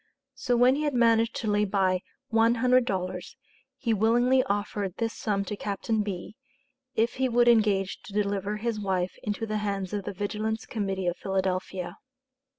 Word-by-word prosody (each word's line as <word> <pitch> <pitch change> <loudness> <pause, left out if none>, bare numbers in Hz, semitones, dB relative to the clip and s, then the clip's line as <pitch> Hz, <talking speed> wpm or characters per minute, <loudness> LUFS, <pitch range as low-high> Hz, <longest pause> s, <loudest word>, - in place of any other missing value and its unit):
So 255 -2 0
when 250 +2 +6
he 290 - -1
had 295 -3 0
managed 230 -1 +3
to 225 - -3
lay 205 0 +2
by 190 -2 +1 0.3
one 230 +1 +4
hundred 250 +1 +4
dollars, 185 -4 -3 0.4
he 240 -4 0
willingly 240 +5 +4
offered 200 -2 -2
this 230 -1 -1
sum 200 -2 -1
to 210 - -4
Captain 210 +2 -1
B., 200 0 -5 0.6
if 230 +3 +1
he 260 0 +1
would 240 0 +3
engage 210 -5 +3
to 200 - -10
deliver 205 0 -1
his 225 0 -2
wife 185 -3 -1
into 210 +1 -2
the 215 -1 -2
hands 200 -2 -2
of 200 -2 -3
the - - -4
Vigilance 215 +3 -2
Committee 195 -4 -2
of 175 0 0
Philadelphia. 190 -1 -2
210 Hz, 170 wpm, -27 LUFS, 195-230 Hz, 0.6 s, when